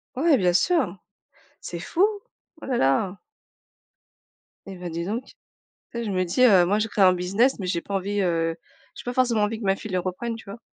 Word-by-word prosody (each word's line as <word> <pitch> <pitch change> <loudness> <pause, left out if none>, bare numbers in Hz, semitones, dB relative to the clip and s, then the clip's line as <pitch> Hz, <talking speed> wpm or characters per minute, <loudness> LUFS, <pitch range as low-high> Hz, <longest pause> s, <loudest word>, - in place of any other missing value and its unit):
Ouais, 295 +1 +4
bien 180 -3 +2
sûr. 200 - +1 0.6
C'est 170 - -6
fou, 335 - +2 0.6
oh - - -8
là 265 - -1
là! 180 - +1 1.5
Et 195 - -7
ben, 180 -1 -6
dis 170 +1 -3
donc, 230 +7 -3
tu - - -17 0.7
sais, - - -2
je 210 - -2
me 185 -1 +1
dis: 180 +8 -1
«Heu, 195 -8 +7
moi 205 +4 +1
je 220 - 0
créé 205 -1 +2
un 185 -1 +6
business, 195 +9 +1
mais 190 - -4
j'ai 175 -2 -1
pas 200 - -5
envie 200 +2 -1
heu, 165 -2 0 0.4
j'ai - - -9
pas 245 - -4
forcément 245 -4 +2
envie 220 +1 -1
que 220 - -6
ma 195 0 +3
fille 210 +1 -8
le 185 - +1
reprenne» 190 +6 -3
tu 225 - -12
vois? 225 - -8
195 Hz, 220 wpm, -24 LUFS, 180-230 Hz, 1.5 s, Heu